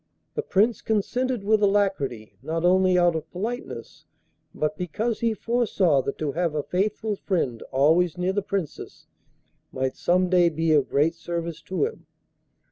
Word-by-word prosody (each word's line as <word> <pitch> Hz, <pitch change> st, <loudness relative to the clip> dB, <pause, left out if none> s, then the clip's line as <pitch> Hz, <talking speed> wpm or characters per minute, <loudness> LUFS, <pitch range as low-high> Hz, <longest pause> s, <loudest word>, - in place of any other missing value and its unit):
The -, -, -1 dB
Prince 220 Hz, -, +1 dB
consented 245 Hz, +2 st, -1 dB
with 215 Hz, +1 st, +3 dB
alacrity, 195 Hz, -, 0 dB
not 165 Hz, +2 st, -2 dB
only 185 Hz, 0 st, +4 dB
out 175 Hz, -1 st, +4 dB
of 160 Hz, -1 st, -4 dB
politeness, 225 Hz, +7 st, -6 dB, 0.5 s
but 155 Hz, 0 st, -2 dB
because 210 Hz, +7 st, -2 dB
he 230 Hz, -1 st, +1 dB
foresaw 205 Hz, -, +2 dB
that 140 Hz, -, -4 dB
to 150 Hz, -2 st, -2 dB
have 165 Hz, 0 st, -1 dB
a 150 Hz, -, -1 dB
faithful 210 Hz, +3 st, -1 dB
friend 165 Hz, -, -2 dB
always 160 Hz, +6 st, +3 dB
near 180 Hz, +1 st, 0 dB
the 205 Hz, -, 0 dB
Princess 195 Hz, -6 st, -5 dB, 0.7 s
might 130 Hz, 0 st, -2 dB
some 180 Hz, +1 st, +2 dB
day 180 Hz, -1 st, +4 dB
be 160 Hz, 0 st, 0 dB
of 145 Hz, -3 st, +3 dB
great 150 Hz, +4 st, +2 dB
service 170 Hz, -1 st, -5 dB
to 190 Hz, -, +1 dB
him. 455 Hz, -, -7 dB
180 Hz, 155 wpm, -25 LUFS, 160-205 Hz, 0.7 s, only